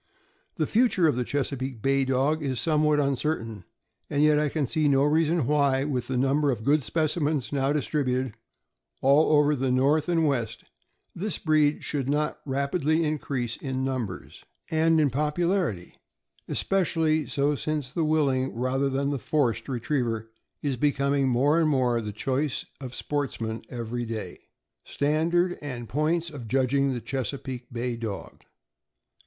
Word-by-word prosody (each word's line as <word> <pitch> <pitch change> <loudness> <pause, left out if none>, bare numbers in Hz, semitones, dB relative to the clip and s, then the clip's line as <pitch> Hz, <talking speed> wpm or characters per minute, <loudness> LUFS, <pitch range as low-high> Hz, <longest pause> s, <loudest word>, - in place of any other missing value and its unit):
The 155 - 0
future 215 - +3
of 150 - +2
the 125 - 0
Chesapeake 135 -2 -3
Bay 135 0 +2
Dog 135 +4 +1
is 135 -4 -2
somewhat 150 -2 +2
uncertain, 130 - -1 0.4
and 145 +1 +1
yet 150 -1 +5
I 150 -1 +1
can 150 -1 -1
see 155 +3 +1
no 135 -1 +4
reason 160 0 +2
why, 140 -1 +2
with 130 -4 -2
the 130 - -1
number 140 +3 +2
of 115 -5 -1
good 145 +4 +3
specimens 150 +1 -1
now 135 0 +1
distributed 130 -3 -1 0.7
all 140 +4 +5
over 150 0 +4
the 135 -1 -1
North 140 +6 +2
and 165 -2 +2
West, 120 -5 -1 0.5
this 200 +2 -2
breed 155 -2 +2
should 140 -3 -2
not 150 +1 0
rapidly 140 +4 +1
increase 135 -6 -2
in 130 -1 -3
numbers 125 -8 -4 0.3
and 160 0 +3
in 145 -3 +3
popularity; 150 - -1 0.5
especially 160 -5 +1
so 145 0 +1
since 150 -2 -3
the 165 - 0
willing, 140 -5 +1
rather 130 +3 0
than 140 +1 -1
the 140 - -2
forced, 140 -2 0
retriever 120 -3 -2 0.3
is 140 -3 -1
becoming 140 0 +1
more 140 +6 +3
and 160 -2 +3
more 125 -4 +2
the 105 -1 -5
choice 130 +6 -2
of 130 -2 -7
sportsmen 115 -6 -3
every 120 0 -4
day. 110 -2 -5 0.4
STANDAKD 170 +5 +1
AND 125 -5 -6
POINTS 160 +5 0
OF 130 -6 -8
JUDGING 135 +2 +1
THE 120 - -4
CHESAPEAKE 130 -1 -4
BAY 120 0 -3
DOG.. 110 -4 -6
140 Hz, 150 wpm, -26 LUFS, 125-150 Hz, 0.7 s, yet